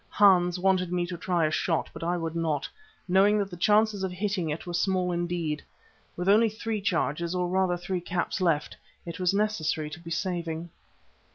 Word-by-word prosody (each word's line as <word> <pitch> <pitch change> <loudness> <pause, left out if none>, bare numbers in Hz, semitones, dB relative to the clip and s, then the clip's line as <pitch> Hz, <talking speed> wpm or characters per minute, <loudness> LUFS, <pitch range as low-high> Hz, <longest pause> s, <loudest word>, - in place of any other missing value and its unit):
Hans 185 -3 +4
wanted 185 -1 +1
me 175 -1 0
to 175 0 -5
try 175 -1 0
a 155 - 0
shot, 165 +1 0
but - - -8
I 175 +1 0
would 165 -1 -4
not, 160 -4 -1 0.4
knowing 195 +3 +4
that 200 -2 -1
the - - -6
chances 210 +2 +3
of 190 - -1
hitting 185 -2 -2
it 150 +2 -4
were 175 - -5
small 180 0 +1
indeed. 170 -3 -2 0.6
With 180 +1 -3
only 220 +3 +5
three 220 0 -4
charges, 170 -2 -1
or 180 0 0
rather 185 -1 +1
three 180 +1 -3
caps 175 +2 -2
left, 165 -5 +1 0.3
it 170 0 -7
was 180 -1 +2
necessary 165 -7 -1
to 155 - -8
be 165 0 -10
saving. 170 -1 -3
180 Hz, 190 wpm, -27 LUFS, 170-190 Hz, 0.6 s, only